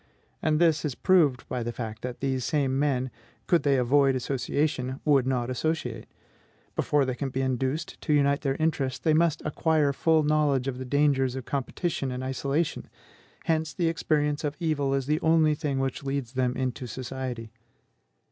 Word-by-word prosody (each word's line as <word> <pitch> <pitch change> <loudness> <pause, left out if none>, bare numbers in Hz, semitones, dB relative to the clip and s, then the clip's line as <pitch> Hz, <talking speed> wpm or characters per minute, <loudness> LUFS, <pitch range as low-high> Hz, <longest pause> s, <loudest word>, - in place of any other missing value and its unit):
And 155 -1 +2
this 160 -2 +3
is 145 -5 -2
proved 155 -9 +3
by 125 - -3
the 120 +1 -2
fact 110 -2 -6
that 125 -1 -6
these 130 -2 -1
same 135 -2 0
men, 130 -3 0 0.3
could 175 - +3
they 140 -2 +3
avoid 135 +2 +3
association, 130 0 -1
would 140 -4 +4
not 125 -2 0
associate. 125 -5 -2 0.7
Before 145 -2 +2
they 130 - -1
can 135 +2 -3
be 130 +1 -2
induced 130 +4 -2
to - - -2
unite 140 -1 +3
their 135 -2 0
interests, 145 -4 0
they 155 - +1
must 160 -1 +2
acquire 150 -1 +1
full 160 +2 +3
knowledge 145 -3 +2
of 130 -2 -3
the 130 - -5
dangers 135 -1 +2
of 130 -2 -5
competition 140 0 -2
and 125 +1 -4
isolation; 135 +5 -2 0.6
hence 160 -1 0
the 170 -3 +1
experience 150 -2 0
of 145 0 -2
evil 145 -5 0
is 135 -1 -1
the 150 +3 +1
only 160 -1 +4
thing 145 -2 -2
which 135 -1 -2
leads 135 -3 -3
them 125 -1 0
into 130 -1 -3
society. 125 -2 -5
140 Hz, 175 wpm, -27 LUFS, 130-155 Hz, 0.7 s, would